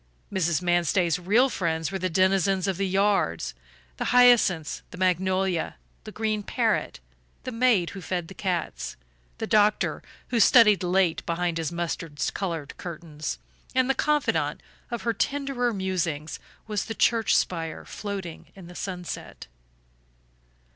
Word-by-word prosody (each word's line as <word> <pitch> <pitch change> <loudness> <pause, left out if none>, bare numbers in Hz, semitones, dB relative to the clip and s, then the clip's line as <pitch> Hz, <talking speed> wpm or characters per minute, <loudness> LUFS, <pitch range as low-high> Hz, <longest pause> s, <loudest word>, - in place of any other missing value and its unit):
Mrs. 170 -2 +1
Manstey's 175 -1 +2
real 210 +9 +4
friends 165 - -2
were 190 - -3
the 185 0 -1
denizens 190 +2 +2
of 190 -3 -1
the 195 0 0
yards, 190 - +1 0.4
the - - -2
hyacinths, 240 -10 +4
the - - -11
magnolia, 185 -1 +1 0.3
the 215 - -7
green 215 -1 -1
parrot, 200 - -1 0.4
the 255 - -4
maid 230 -7 +2
who 195 - -8
fed 175 -1 -3
the 195 - -10
cats, 180 -4 -3 0.4
the - - -3
doctor 210 0 +2 0.3
who 240 - +1
studied 210 -2 +6
late 180 -2 +1
behind 170 0 -1
his 165 0 -2
mustard 165 -3 -4
colored 165 -7 -4
curtains; 155 - -6 0.4
and 255 +1 +3
the - - +2
confidant 300 +1 0 0.3
of 235 -2 -4
her 230 0 +1
tenderer 275 -3 -1
musings 175 -6 -2 0.3
was 210 -2 -2
the 225 - -5
church 225 -2 +3
spire 165 -3 -2
floating 195 -5 -6
in 190 -3 -11
the 175 - -11
sunset. 180 -1 -6
185 Hz, 140 wpm, -26 LUFS, 170-215 Hz, 0.4 s, studied